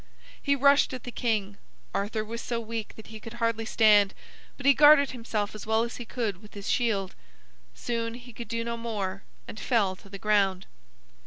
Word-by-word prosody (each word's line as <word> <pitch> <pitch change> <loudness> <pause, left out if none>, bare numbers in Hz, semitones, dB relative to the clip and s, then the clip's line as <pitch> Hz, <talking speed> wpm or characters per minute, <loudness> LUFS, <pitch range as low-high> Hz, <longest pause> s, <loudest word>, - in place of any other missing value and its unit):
He 280 -1 +2
rushed 280 -1 +4
at 250 - -9
the 245 - -6
king. 210 -5 -1 0.4
Arthur 215 +2 -1
was 230 +2 -5
so 235 -1 -2
weak 225 -1 -5
that 220 - -12
he 220 - -7
could 225 +1 -9
hardly 230 -1 -1
stand, 210 -3 +4 0.4
but 275 - -9
he 280 - +7
guarded 290 -1 +7
himself 225 -4 -3
as 215 0 -9
well 220 +1 +3
as 235 - -5
he 240 - -7
could 220 -6 -3
with 210 -1 -15
his 200 -1 -7
shield. 205 -6 0 0.6
Soon 230 -1 -3
he 245 0 -12
could 235 +2 -8
do 230 +1 -2
no 235 0 -3
more, 205 -4 -3 0.3
and 215 - -8
fell 205 -7 +1
to 195 - -17
the 195 - -7
ground. 195 -2 +1
225 Hz, 195 wpm, -27 LUFS, 205-235 Hz, 0.6 s, he